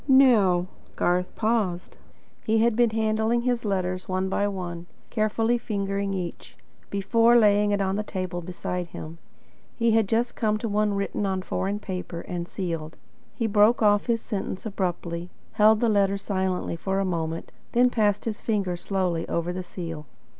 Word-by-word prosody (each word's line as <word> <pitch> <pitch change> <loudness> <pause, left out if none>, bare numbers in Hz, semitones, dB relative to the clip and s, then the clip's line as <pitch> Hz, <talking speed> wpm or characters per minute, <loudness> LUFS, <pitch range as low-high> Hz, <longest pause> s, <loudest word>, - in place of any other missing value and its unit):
Now 225 -10 +5 0.2
" - - -28
Garth 180 +1 0
paused. 215 -6 -1 0.5
He 220 +1 +2
had 230 0 +3
been 240 0 +4
handling 220 +1 +1
his 245 -1 0
letters, 185 -2 -2
one 185 +1 0
by 200 +1 +1
one; 175 -3 -5 0.2
carefully 225 +2 +1
fingering 200 -2 -2
each, 180 -2 -6 0.3
before 230 +4 +3
laying 210 -2 +4
it 205 -1 +1
on 195 0 0
the - - 0
table 185 -4 -4
beside 180 0 -4
him. 165 0 -9 0.6
He 230 -1 +2
had 220 -3 +3
just 235 +2 +1
come 215 -1 +1
to 230 - -3
one 210 -1 +1
written 200 0 -1
on 190 -1 -1
foreign 195 +2 -2
paper, 185 -4 -5
and 175 -1 -5
sealed. 165 -5 -4 0.4
He 230 - -1
broke 215 +2 +4
off 205 +1 +4
his 230 -1 +1
sentence 195 -2 -4
abruptly, 175 -4 -3 0.2
held 215 +1 +5
the 235 - +3
letter 200 -2 +3
silently 190 -3 -2
for 190 +3 -2
a 195 - +1
moment, 165 -2 -3 0.2
then 245 +1 +4
passed 210 -3 +1
his 220 -2 -3
fingers 195 -6 -1
slowly 180 -4 -1
over 170 +1 -1
the 185 - -3
seal. 165 -4 -7
200 Hz, 170 wpm, -26 LUFS, 180-220 Hz, 0.6 s, Now